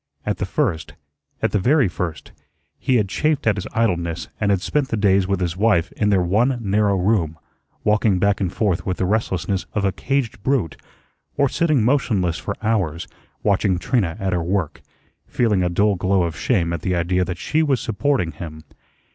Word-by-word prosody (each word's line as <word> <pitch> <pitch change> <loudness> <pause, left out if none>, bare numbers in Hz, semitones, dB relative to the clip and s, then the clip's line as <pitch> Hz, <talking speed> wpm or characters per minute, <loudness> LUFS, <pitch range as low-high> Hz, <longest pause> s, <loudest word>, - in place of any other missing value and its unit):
At 105 - -1
the 100 - -3
first 95 - -1 0.5
at - - +2
the 105 - +1
very 130 +4 +3
first 85 -1 -5 0.5
he 130 - +1
had 105 -4 +2
chafed 155 +8 0
at 110 - +3
his 95 - -4
idleness 85 -7 -1
and 105 - +1
had 100 -2 +3
spent 145 +6 0
the 115 - -2
days 100 -2 +3
with 100 -1 0
his 90 -2 -1
wife 100 -3 +2
in 105 - 0
their 95 -3 +3
one 115 +9 +2
narrow 100 -2 +1
room, 90 -5 +1 0.5
walking 105 -2 +2
back 100 +2 +1
and 90 -3 0
forth 100 -5 0
with 90 - -2
the 95 - 0
restlessness 95 -3 -1
of 100 -2 +1
a 95 - +2
caged 135 -2 -2
brute, 115 - 0 0.6
or 140 -1 +4
sitting 150 -4 +1
motionless 105 - +1
for - - -4
hours, 90 -7 0 0.4
watching 100 -2 +2
Trina 100 -5 0
at 95 -2 -1
her 90 - 0
work, 85 -2 -2 0.5
feeling 110 -6 +1
a 90 - +1
dull 100 +4 +2
glow 95 0 +1
of 85 -2 -2
shame 85 -9 0
at 85 - -3
the 90 - 0
idea 90 +2 +1
that 90 -1 -4
she 155 - 0
was 140 -5 +2
supporting 115 - 0
him. 80 0 -9
100 Hz, 190 wpm, -21 LUFS, 90-115 Hz, 0.6 s, or